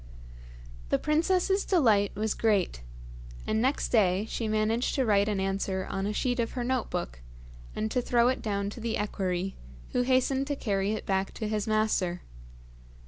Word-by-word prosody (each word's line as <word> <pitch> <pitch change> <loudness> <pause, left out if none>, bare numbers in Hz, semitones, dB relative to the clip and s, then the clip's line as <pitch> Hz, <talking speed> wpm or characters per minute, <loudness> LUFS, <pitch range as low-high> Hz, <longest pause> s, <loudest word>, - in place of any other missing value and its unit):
The - - +3
princess's 365 +5 +2
delight 220 - +3
was 215 +1 0
great, 200 - +1 0.6
and 220 - 0
next 265 +4 +1
day 195 -3 +3
she 225 0 -3
managed 215 +3 +1
to 265 - +2
write 205 -1 +3
an 205 -2 -1
answer 190 -1 -1
on 195 0 -2
a - - -1
sheet 245 +3 -1
of 230 - -1
her 250 - -2
note 255 0 -1
book, - - -4 0.5
and 215 0 -2
to 250 - +1
throw 240 0 +3
it 255 - 0
down 200 -2 -2
to 235 - -9
the 230 0 -2
equerry, 190 -2 -2 0.3
who 250 - +1
hastened 260 +2 +2
to 290 - -1
carry 200 -5 0
it 220 - -4
back 195 0 -1
to 215 - -3
his 210 -1 -2
master. 215 -5 +1
215 Hz, 175 wpm, -28 LUFS, 200-245 Hz, 0.6 s, The